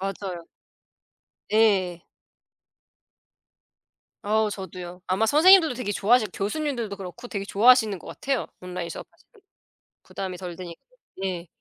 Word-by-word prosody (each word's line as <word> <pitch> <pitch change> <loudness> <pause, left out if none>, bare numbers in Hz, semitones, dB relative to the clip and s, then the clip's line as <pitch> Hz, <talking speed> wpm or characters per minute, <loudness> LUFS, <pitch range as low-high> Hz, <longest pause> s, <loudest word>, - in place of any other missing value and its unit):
맞아요. 190 -3 -5 1.1
예. 190 -6 +2 2.2
아우 215 +1 +1
저두요. 180 -2 -8
아마 190 +5 +1
선생님들도 320 - +6
되게 210 -4 -3
좋아하싯 215 +1 +3
교수님들도 235 -1 -3
그렇고 195 +6 -9
되게 200 -2 -4
좋아하시는 220 -1 +4
것 - - -15
같아요 270 -2 -2
온라인 180 -1 -5
수업 - - -8
사실은. 430 - -26 0.6
부담이 185 -2 -6
덜 180 -2 -7
되니까. 170 -1 -9 0.4
예. 180 -2 -3
200 Hz, 295 characters per minute, -25 LUFS, 180-235 Hz, 2.2 s, 선생님들도